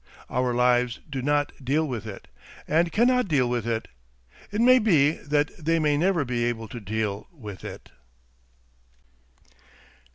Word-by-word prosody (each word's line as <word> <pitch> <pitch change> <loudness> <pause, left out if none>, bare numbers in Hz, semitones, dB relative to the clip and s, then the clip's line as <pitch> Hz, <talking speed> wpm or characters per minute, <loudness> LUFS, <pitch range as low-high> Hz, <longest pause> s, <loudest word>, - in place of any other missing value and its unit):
Our 125 0 +1
lives 125 -1 +2
do 135 -3 -4
not 145 +2 +1
deal 150 +5 +1
with 115 -5 -5
it, 100 - -9 0.4
and 170 +2 +2
cannot 250 +1 +3
deal 140 -7 +2
with 120 -2 -2
it. 115 -1 -2 0.6
It 205 - -2
may 255 +2 +6
be 160 - +4
that 145 -1 -1
they 165 +2 +2
may 150 -2 +2
never 170 -1 +1
be 120 -1 -1
able 115 -2 -2
to 120 - -7
deal 105 -1 -3
with 105 - -10
it. - - -9
140 Hz, 150 wpm, -25 LUFS, 120-160 Hz, 0.6 s, may